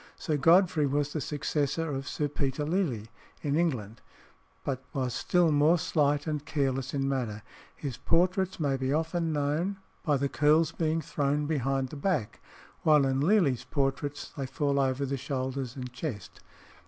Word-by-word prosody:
Sir 155 - -2
Godfrey 165 0 +4
was 145 +1 0
the 155 - -2
successor 150 +2 -1
of 135 0 -4
Sir 150 - -1
Peter 140 0 -2
Lely 145 - -1 0.3
in 145 -1 0
England, 125 -11 -1 0.6
but 130 -2 -3
was 130 -3 -1
still 175 +4 +2
more 150 +4 +4
slight 145 -3 +1
and 150 -2 -2
careless 135 -2 -1
in 135 -1 0
manner. 120 -6 -2 0.3
His 135 -5 -5
portraits 185 +3 +1
may 140 -3 +1
be 130 0 -1
often 165 +2 0
known 155 +6 0 0.2
by 150 -4 +2
the 140 +1 0
curls 155 +3 +3
being 160 0 0
thrown 145 -1 0
behind 135 -3 0
the 150 - -8
back, 140 - -1 0.4
while 150 -3 +5
in 135 0 +1
Lely's 150 - +3
portraits 140 +2 -2
they 135 -3 -3
fall 140 +1 0
over 135 0 +1
the 140 +1 -2
shoulders 130 -1 -3
and 125 -2 -6
chest. 125 - -6
145 Hz, 160 wpm, -29 LUFS, 135-155 Hz, 0.6 s, while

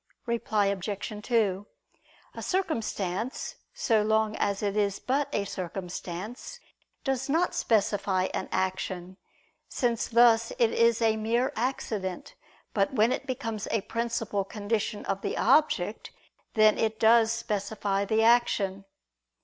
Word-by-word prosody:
Reply 225 -3 0
Obj. 200 +1 -3
2: 210 -4 0 0.7
A - - -7
circumstance, 230 - -2
so 235 - +2
long 220 0 +1
as 200 +1 -1
it 200 -1 0
is 200 -2 +1
but 275 +2 -1
a 200 - -1
circumstance, 185 - -6 0.4
does 270 0 -1
not 335 +5 +2
specify 200 -3 +1
an - - -3
action, 185 -1 -2 0.5
since 235 -4 0
thus 230 -1 +5
it 230 -2 +3
is 230 0 +3
a 220 -1 +3
mere 235 +4 0
accident: 215 -7 -3 0.4
but 195 -2 +1
when 225 +1 +4
it 275 - -3
becomes 225 -5 -3
a 225 - 0
principal 230 -2 -2
condition 210 +1 -3
of 195 0 -2
the - - -3
object, 240 -7 +2 0.5
then 215 -1 +5
it 220 -1 0
does 225 0 +5
specify 205 -3 -1
the 220 +2 +2
action. 205 -5 +2
220 Hz, 125 wpm, -28 LUFS, 200-235 Hz, 0.7 s, thus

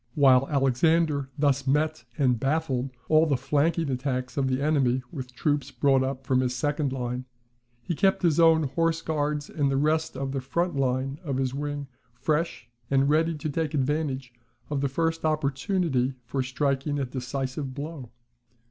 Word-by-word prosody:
While 135 -2 +5
Alexander 140 +1 +2
thus 140 -2 +1
met 155 +3 +1
and 125 -5 +2
baffled 135 -1 0 0.2
all 155 +1 +5
the 140 -4 +2
flanking 150 +3 +1
attacks 130 -1 -2
of 140 -2 +1
the 130 0 0
enemy 135 -4 +2
with 125 -3 -7
troops 145 -2 0
brought 135 -2 +2
up 135 0 -3
from 130 -2 +2
his 125 -1 0
second 145 +1 0
line, 125 -1 -3 0.6
he 170 - -2
kept 190 +3 +2
his 170 -2 +3
own 165 -1 +6
horse 165 +4 0
guards 150 -1 -1
and 145 -3 0
the 135 - +1
rest 155 0 +1
of 135 0 -3
the 135 -1 -2
front 170 +6 -1
line 135 +1 0
of 140 -5 -2
his 130 -1 -1
wing 145 0 -4 0.3
fresh, 150 -3 -1 0.2
and 140 0 +3
ready 165 +2 +2
to 155 +1 -4
take 155 0 -1
advantage 135 -2 -1 0.4
of 140 -2 0
the 140 - +1
first 165 +3 -1
opportunity 145 -2 0
for 130 +3 -2
striking 140 +2 -1
a 140 - 0
decisive 130 +1 -4
blow. 145 -3 -6
140 Hz, 165 wpm, -26 LUFS, 130-155 Hz, 0.6 s, own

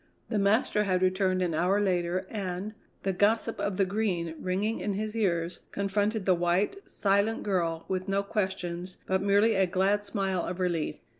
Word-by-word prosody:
The 215 - 0
master 210 +1 +2
had 185 -1 +1
returned 185 0 +2
an 175 -2 -1
hour 180 +5 +2
later 185 -2 0
and, 195 0 -4 0.3
the 195 - 0
gossip 220 +4 +1
of 200 -2 -1
the 195 - +3
Green 185 -5 -1
ringing 200 +5 -1
in 205 - -2
his 215 +2 -3
ears, 175 -5 0
confronted 205 +1 -1
the 185 - +5
white, 180 - 0
silent 200 +3 +1
girl 170 -5 -1
with 185 0 -2
no 200 0 +1
questions, 185 -3 -3
but 190 0 +1
merely 205 +3 +4
a 190 -2 +3
glad 195 +3 +1
smile 195 -3 -1
of 180 +1 -4
relief. 170 -4 0
195 Hz, 170 wpm, -28 LUFS, 180-205 Hz, 0.3 s, the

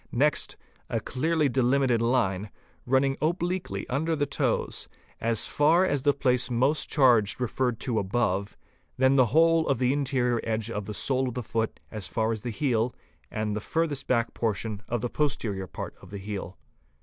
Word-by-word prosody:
Next, 145 +5 +1 0.3
a - - 0
clearly 155 +3 0
delimited 130 -1 +2
line, 115 -6 +1
i - - -12 0.4
running 135 +1 +2
obliquely 170 - -1
under 160 +5 0
the 145 -1 0
toes, 140 - -1 0.3
as 115 -1 +1
far 160 +5 +4
as 145 -7 0
the 145 - +4
place 125 -3 +2
most 130 +6 +1
charged 120 -8 +4
referred 125 -1 -1
to 120 -5 0
above, 100 -1 -1 0.4
then 130 +1 +4
the 130 -3 +5
whole 165 +4 +4
of 140 - +2
the 125 +2 +2
interior 130 -4 +1
edge 110 0 -2
of 105 -3 -3
the 105 +1 -5
sole 130 +7 +1
of 125 - -5
the 125 - -3
foot 110 +1 -2
as 105 -4 -4
far 110 -1 0
_ - - +1
as 110 - -5
the 120 - -4
heel 120 -1 0 0.3
and 110 -1 -2
the 105 - -3
furthest 150 0 -1
back 120 -2 +1
portion 110 -2 -2
of 120 -2 -1
the 120 - -1
posterior 110 -11 -1
part - - -7
of 95 - -14
the 100 - -6
heel. 95 -2 -6
125 Hz, 185 wpm, -27 LUFS, 110-140 Hz, 0.4 s, the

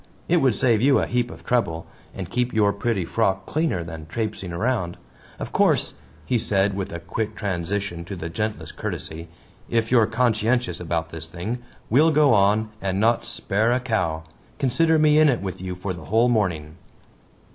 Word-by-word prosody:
It 175 - +3
would 130 -8 +3
save 115 -3 +3
you 135 +2 +5
a - - +1
heap 120 0 0
of - - -12
trouble 85 -10 0 0.3
and 95 -2 -5
keep 125 +5 -1
your 105 -2 +3
pretty 100 -3 -1
frock 95 -3 0
cleaner 155 - -1
than 80 -1 -8
trapesing 105 -1 -3
round. 90 -1 -1 0.4
Of - - -6
course," - - +2 0.3
he 125 -2 +1
said, 100 -1 +2
with 95 -1 -4
a 85 - -5
quick 105 +6 -4
transition 95 -2 -3
to 100 +2 -6
the 85 -2 -5
gentlest 105 +6 -4
courtesy, 80 +1 -5 0.4
"if 115 -1 0
you're 115 -4 +5
conscientious 115 -3 +1
about 80 -1 -2
this 80 -1 -6
thing 90 +9 -4 0.3
we'll 150 +8 +5
go 150 -4 +4
on 105 +2 +3
and 95 0 -1
not 115 +2 +2
spare 110 +4 0
a 125 - +2
cow. 95 -10 -1 0.3
Consider 160 +5 +2
me 155 0 +5
in 155 -1 +6
it 120 -7 0
with 95 -2 -5
you 90 -1 -4
for 90 +1 -4
the 85 - -10
whole 115 +4 +3
morning." 85 -10 -1
105 Hz, 180 wpm, -23 LUFS, 90-120 Hz, 0.4 s, in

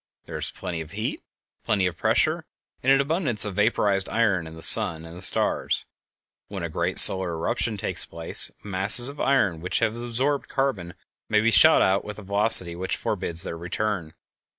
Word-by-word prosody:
There - - -10
is - - -2
plenty 85 -2 -7
of 80 - -12
heat, - - -5 0.4
plenty 100 -3 -1
of 90 -1 -3
pressure, - - 0 0.4
and 130 - +1
an 135 - +4
abundance 140 - +1
of 105 - -6
vaporized 105 -1 -1
iron 100 -8 -1
in 80 - -12
the 80 - -3
sun 80 -1 +2
and 80 +1 -12
the 90 - -8
stars. 90 - +2 0.6
When 95 -3 -8
a 85 - -4
great 80 - -3
solar 95 -2 +5
eruption 110 +6 -3
takes - - -1
place, 80 0 -1
masses 105 +6 +4
of 145 - -12
iron 100 -12 0
which 90 - -2
have 115 -1 -1
absorbed 120 +4 -3
carbon 105 -11 -3 0.3
may 110 - +2
be 115 +2 +1
shot 100 -2 +6
out 95 +1 0
with 105 -1 -9
a 105 - -11
velocity 100 -3 +4
which 95 +2 -4
forbids 85 0 -1
their - - -4
return. 90 -2 -5
100 Hz, 185 wpm, -23 LUFS, 85-115 Hz, 0.6 s, shot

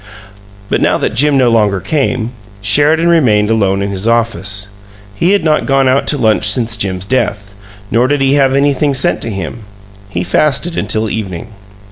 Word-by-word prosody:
But - - -1
now - - +2
that - - -2
Jim 140 +4 +2
no 125 -3 +3
longer 105 -4 +2
came, 125 - -2 0.3
Sheridan 145 - +2
remained 115 -11 +2
alone 100 -3 +1
in 100 - -3
his 100 +2 -3
office; 105 -3 0 0.4
he 165 - 0
had 200 -2 +2
not 155 -1 +1
gone 135 -1 +2
out 130 +2 +1
to 145 - +1
lunch 110 -5 +1
since 115 -3 -1
Jim's 95 -3 -3
death, 105 -4 -2 0.4
nor 120 +3 +2
did 145 +1 0
he 135 0 +2
have 135 -2 +2
anything 140 0 +1
sent 130 - +1
to - - -2
him 100 +3 -6 0.5
he 90 -3 -3
fasted 150 - 0
until 110 +2 -1
evening. 105 -1 -5
115 Hz, 175 wpm, -13 LUFS, 105-140 Hz, 0.5 s, no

